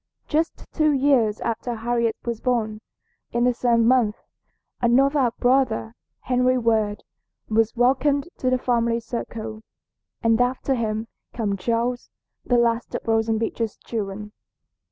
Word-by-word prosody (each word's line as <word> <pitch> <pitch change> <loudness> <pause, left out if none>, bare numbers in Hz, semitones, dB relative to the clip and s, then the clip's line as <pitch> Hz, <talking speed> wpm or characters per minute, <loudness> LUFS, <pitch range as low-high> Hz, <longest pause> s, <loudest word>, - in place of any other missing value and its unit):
Just 320 +2 -1
two 310 -1 +3
years 260 -6 +2
after 235 +1 -2
Harriet 230 0 0
was 235 -2 -2
born, 220 -4 -1 0.5
in 235 0 +1
the 250 0 +3
same 235 -1 +2
month, 240 -4 +3 0.7
another 265 +2 +3
brother, 245 - +1 0.3
Henry 250 0 +2
Ward, 220 -3 +1 0.5
was 225 +1 +2
welcomed 275 +4 +2
to 255 - +1
the 255 - +2
family 235 -2 +1
circle, 225 -2 -6 0.6
and 225 +1 +3
after 255 +2 0
him 220 -2 -2 0.3
came 210 -4 -1
Charles, 235 +5 -1 0.3
the 245 - +2
last 235 0 +1
of - - -3
Roxanna 225 0 +1
Beecher's 225 -1 -2
children. 210 -2 -5
235 Hz, 130 wpm, -23 LUFS, 225-250 Hz, 0.7 s, two